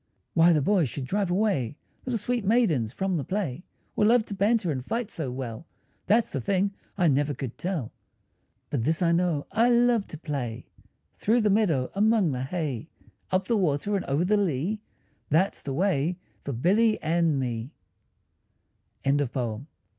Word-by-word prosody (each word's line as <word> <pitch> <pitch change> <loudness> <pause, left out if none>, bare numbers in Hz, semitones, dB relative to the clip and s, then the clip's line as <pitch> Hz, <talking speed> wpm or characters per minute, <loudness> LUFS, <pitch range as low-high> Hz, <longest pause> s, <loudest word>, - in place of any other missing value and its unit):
Why 170 +1 +6
the 150 -4 +3
boys 180 - +2
should 130 +2 -4
drive 200 +6 -1
away 175 - 0 0.3
Little 250 -2 0
sweet 240 +2 -1
maidens 190 - +2
from 190 +2 -1
the 145 - -2
play, 185 -7 -3 0.3
Or - - +2
love 225 +1 +4
to - - -6
banter 200 -2 +2
and 130 -3 -3
fight 225 - -3
so 155 -6 -2
well, 125 +3 -6 0.4
That's 225 +2 +3
the 135 - -2
thing 195 - +1 0.2
I 180 -3 +3
never 145 0 +2
could 125 -1 -5
tell. 170 - -3 0.8
But 125 -6 0
this 160 +6 +1
I 170 - +3
know, 170 -4 +1
I 225 +4 +3
love 240 -3 +3
to 160 - -8
play 130 -7 -4 0.5
Through 230 +3 +2
the 210 -1 +3
meadow, 170 -12 +2
among 210 -4 +3
the 125 -1 -3
hay; 150 -1 -3 0.4
Up 185 0 +1
the 230 - +1
water 185 +1 +1
and 195 - -1
over 145 +6 +1
the 210 +3 +3
lea, 190 +3 -1 0.5
That's 175 +6 +2
the 140 - -5
way 175 -1 +1 0.3
for 140 - -4
Billy 205 - +2
and 165 -1 +2
me. 120 0 -3 1.3
JAMES 140 -1 +2
HOGG. 120 -1 -2
170 Hz, 170 wpm, -27 LUFS, 140-205 Hz, 1.3 s, Why